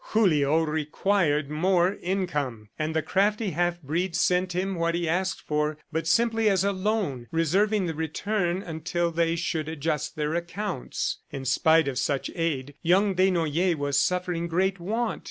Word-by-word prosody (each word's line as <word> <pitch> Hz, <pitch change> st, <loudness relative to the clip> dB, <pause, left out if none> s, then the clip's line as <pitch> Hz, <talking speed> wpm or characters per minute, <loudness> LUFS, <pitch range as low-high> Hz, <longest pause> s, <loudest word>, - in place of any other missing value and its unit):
Julio 160 Hz, -7 st, +3 dB
required 155 Hz, 0 st, 0 dB
more 180 Hz, +3 st, +2 dB
income, 145 Hz, -, -2 dB
and 155 Hz, +1 st, -2 dB
the 160 Hz, -, +1 dB
crafty 205 Hz, +1 st, +1 dB
half 175 Hz, +2 st, 0 dB
breed 165 Hz, +5 st, -1 dB
sent 180 Hz, +2 st, +2 dB
him 190 Hz, +2 st, -1 dB
what 170 Hz, -1 st, 0 dB
he 170 Hz, -1 st, -1 dB
asked 185 Hz, +3 st, -1 dB
for, 150 Hz, 0 st, -1 dB
but 160 Hz, 0 st, -2 dB
simply 225 Hz, +4 st, +3 dB
as 190 Hz, -2 st, +2 dB
a 200 Hz, -, +2 dB
loan, 185 Hz, -, -1 dB
reserving 190 Hz, +6 st, +2 dB
the 165 Hz, -, -2 dB
return 175 Hz, +4 st, -1 dB
until 170 Hz, +1 st, -2 dB
they 165 Hz, 0 st, +1 dB
should 165 Hz, -2 st, -2 dB
adjust 155 Hz, -1 st, -2 dB
their 150 Hz, 0 st, -1 dB
accounts. 175 Hz, -1 st, -3 dB
In 135 Hz, -1 st, -6 dB
spite 160 Hz, +3 st, +4 dB
of 130 Hz, -2 st, -1 dB
such 140 Hz, -2 st, -1 dB
aid, 145 Hz, -5 st, -2 dB
young 190 Hz, +4 st, +3 dB
Desnoyers 175 Hz, -2 st, +2 dB
was 145 Hz, -2 st, 0 dB
suffering 180 Hz, 0 st, 0 dB
great 185 Hz, +3 st, 0 dB
want. 220 Hz, +6 st, -2 dB
170 Hz, 155 wpm, -26 LUFS, 155-190 Hz, -, spite